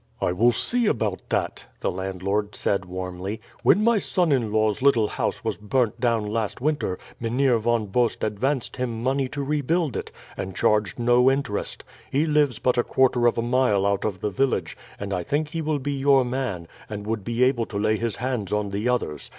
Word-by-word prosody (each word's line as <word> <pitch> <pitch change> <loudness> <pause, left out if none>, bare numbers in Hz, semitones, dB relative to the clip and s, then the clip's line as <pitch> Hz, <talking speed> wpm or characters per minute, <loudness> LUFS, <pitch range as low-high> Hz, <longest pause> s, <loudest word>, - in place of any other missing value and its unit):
"I - - +1
will 115 +7 +4
see 240 - +1
about 105 - 0
it," - - -1
the - - -1
landlord 95 +3 -2
said 100 -1 0
warmly. 90 +3 -5 0.2
"When 205 - +4
my 230 -1 +4
son 180 -4 +1
in 120 -6 +1
law's 110 0 +1
little 125 -6 +4
house - - -2
was - - -2
burnt 115 +2 0
down 115 -3 +1
last 105 0 -2
winter, 140 -9 -1 0.2
Mynheer 120 +1 +2
Von 115 0 +1
Bost 120 +4 0
advanced 120 +7 -1
him 120 -3 -3
money 135 +1 +1
to 140 +2 -4
rebuild 150 +1 0
it, - - -4 0.2
and 95 -1 -5
charged 105 -2 +1
no 120 +2 +4
interest. 135 -6 -2 0.3
He 145 +4 +2
lives 150 -6 +2
but 125 +1 +1
a - - +3
quarter 125 -2 +3
of 120 - +1
a 115 - 0
mile 120 -5 +2
out 100 -1 +1
of 100 -4 -3
the 105 - -1
village, 125 -11 0 0.2
and 100 -1 -4
I 90 - -1
think 150 - -1
he 165 +1 -3
will 155 -1 0
be 145 +1 -3
your 135 -1 +4
man, 125 -9 -3 0.2
and 105 -1 -6
would 110 -2 -2
be 120 +3 0
able 125 -3 +2
to 100 - -5
lay 110 +1 +2
his 115 -2 -2
hands 125 -6 -3
on 105 -1 -1
the 105 +5 -1
others. 75 - -2
115 Hz, 200 wpm, -24 LUFS, 105-135 Hz, 0.3 s, will